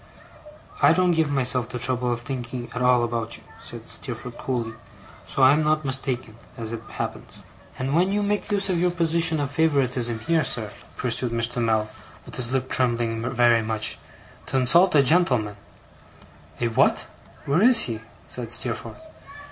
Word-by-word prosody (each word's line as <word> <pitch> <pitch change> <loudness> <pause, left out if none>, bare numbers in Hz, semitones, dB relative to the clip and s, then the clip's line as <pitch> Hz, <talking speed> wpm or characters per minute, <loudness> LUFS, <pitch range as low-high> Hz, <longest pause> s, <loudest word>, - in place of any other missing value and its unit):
'I - - +6
don't 185 -1 +2
give 160 -3 +1
myself 125 -3 +2
the 125 - -4
trouble 125 0 +1
of 120 0 -3
thinking 125 -2 -6
at 125 - -4
all 125 -1 +4
about 115 -1 -3
you,' - - -18 0.2
said - - -9
Steerforth, 125 -1 -6
coolly; 120 -4 -3 0.5
'so 135 - 0
I'm 140 +4 +6
not 155 0 +1
mistaken, 130 -4 -1 0.2
as 115 -1 -6
it 115 -1 -5
happens.' - - -6 0.3
'And 130 +2 -2
when 180 +4 +2
you 205 +1 0
make 205 +1 -1
use 200 -1 +2
of 180 -3 0
your 180 +1 +2
position 165 -1 +2
of 140 -1 -2
favouritism 130 -6 0
here, 165 +4 +1
sir,' 120 -6 -1 0.3
pursued 125 0 0
Mr. 115 +1 0
Mell, 110 -1 +1 0.4
with - - -12
his 125 -1 0
lip 130 -1 -1
trembling 120 -3 0
very 120 -2 +4
much, 110 -1 -1 0.5
'to 135 - -1
insult 170 +8 +5
a 140 - +6
gentleman 125 - +2 0.5
' - - -25
'A 120 - 0
what? 115 - +2 0.4
where 145 +6 +1
is 240 0 +6
he?' 115 -2 -3 0.3
said 120 -2 -4
Steerforth. 120 - 0
125 Hz, 170 wpm, -24 LUFS, 120-155 Hz, 0.5 s, I